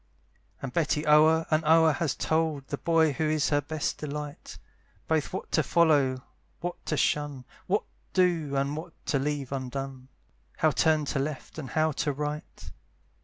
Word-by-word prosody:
And 130 -2 -4
Betty 155 -2 +1
o'er 155 +2 +5
and 155 +1 +3
o'er 160 +1 +5
has 150 0 -1
told 155 -4 -1
The 145 - -3
boy 165 -2 +3
who 155 +2 0
is 155 -3 +1
her 145 -1 +2
best 155 +1 -3
delight, 150 -1 -6 0.5
Both 160 -2 0
what 190 - -6
to - - +3
follow, 145 -7 +3 0.4
what 175 0 -5
to 155 - 0
shun, 145 -4 0 0.2
What - - +1 0.3
do, 170 -6 +1
and 140 +1 0
what 165 +2 -7
to 140 - +1
leave 140 -1 -2
undone, 135 0 -5 0.5
How 155 - +3
turn 155 0 +2
to 140 - -1
left, 145 +2 -4
and 135 -4 -6
how 155 +2 +1
to 145 +1 -1
right. 150 +2 -5
150 Hz, 165 wpm, -28 LUFS, 140-160 Hz, 0.5 s, o'er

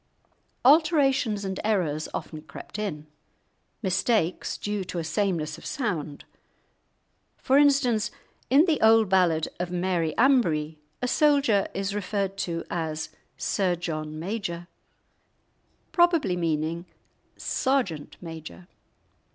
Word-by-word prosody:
Alterations 270 - +4
and 190 -1 -3
errors 175 -8 0
often 155 -1 -6
crept 210 - -9
in; 160 -8 -4 0.8
mistakes 190 -1 0
due 205 -1 -3
to 180 - -6
a 170 - -1
sameness 170 -3 -1
of - - -14
sound. 175 - -3 1.1
For 265 - +1
instance, 250 -7 +3 0.4
in 280 +6 +6
the 320 -6 +1
old 220 -2 +5
ballad 175 -4 +3
of 180 0 -2
Mary 175 -3 -1
Ambree, 165 - +2 0.2
a - - +2
soldier 280 -8 +3
is 195 0 -2
referred 200 -1 -2
to 170 -3 -2
as 155 -2 -3 0.3
"Sir 185 -3 0
John 155 -3 -4
Major," 175 -1 -4 1.2
probably 335 - +3
meaning 165 0 -1 0.5
Sergeant 245 - -1
major. 165 +1 -9
190 Hz, 110 wpm, -26 LUFS, 165-230 Hz, 1.2 s, in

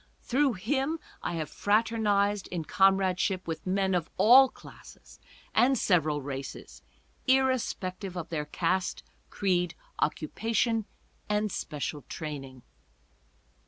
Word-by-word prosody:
Through 270 +1 +2
him 270 - -1 0.2
I - - -3
have 160 -2 -2
fraternized 205 -2 +1
in 170 -3 -4
comradeship 190 0 +2
with 165 +2 -5
men 190 0 +1
of 170 -2 0
all 260 +4 +8
classes - - -15 0.3
and 265 +2 +4
several 155 -8 +2
races, 135 -1 -7 0.5
irrespec 260 -8 +1
tive 190 -3 -6
of 165 -2 -5
their 150 -3 -2
caste, 180 +4 -1 0.3
creed, 180 -4 0 0.2
occupation 225 +7 0 0.4
and 210 0 +1
special 150 -1 -4
training. 135 -5 -7
190 Hz, 110 wpm, -29 LUFS, 165-220 Hz, 0.5 s, all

